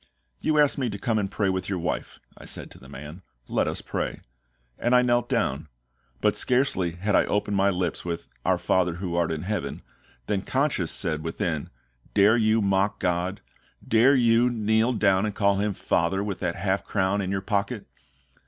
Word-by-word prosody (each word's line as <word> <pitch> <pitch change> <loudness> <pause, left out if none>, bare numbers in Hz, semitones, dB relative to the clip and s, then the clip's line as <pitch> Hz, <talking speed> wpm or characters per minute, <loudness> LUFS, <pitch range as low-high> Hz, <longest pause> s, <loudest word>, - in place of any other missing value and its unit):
"You 155 -1 +1
asked 145 -1 +4
me 130 -3 0
to 100 - -5
come 110 +1 0
and 100 -2 -1
pray 100 -1 0
with 95 +1 -3
your 95 - -1
wife," 85 - -4 0.2
I - - -13
said - - -6
to - - -13
the - - -14
man, 75 +7 -9 0.3
"let - - 0
us - - -3
pray." - - -3 0.6
And 120 +2 +2
I 125 - +6
knelt 120 -1 +1
down. 70 +4 0 0.5
But - - +2
scarcely 125 -9 +1
had 100 +4 -2
I - - +4
opened 105 0 -1
my 100 0 +3
lips 90 -3 -2
with 85 -1 -4 0.2
"Our - - +2
FATHER 90 -2 +1
who 90 -1 -4
art 85 -1 +1
in 80 -1 -3
heaven" 95 -9 -3 0.4
than 100 +5 -1
conscience 130 - 0
said 80 -5 0
within, 80 -2 -2 0.5
"Dare 105 +2 +6
you 110 -1 +3
mock 100 +1 +1
GOD? 90 +3 -1 0.5
Dare 120 +5 +5
you 120 -1 +4
kneel 110 +1 +1
down 100 -2 +2
and 105 - -5
call 100 -2 +2
Him 100 0 -1
FATHER 95 +1 0
with 100 -2 -4
that - - -2
half 95 +1 -1
crown 100 0 0
in 95 - -3
your 95 0 -1
pocket?" 100 +2 -2
100 Hz, 190 wpm, -26 LUFS, 90-110 Hz, 0.6 s, I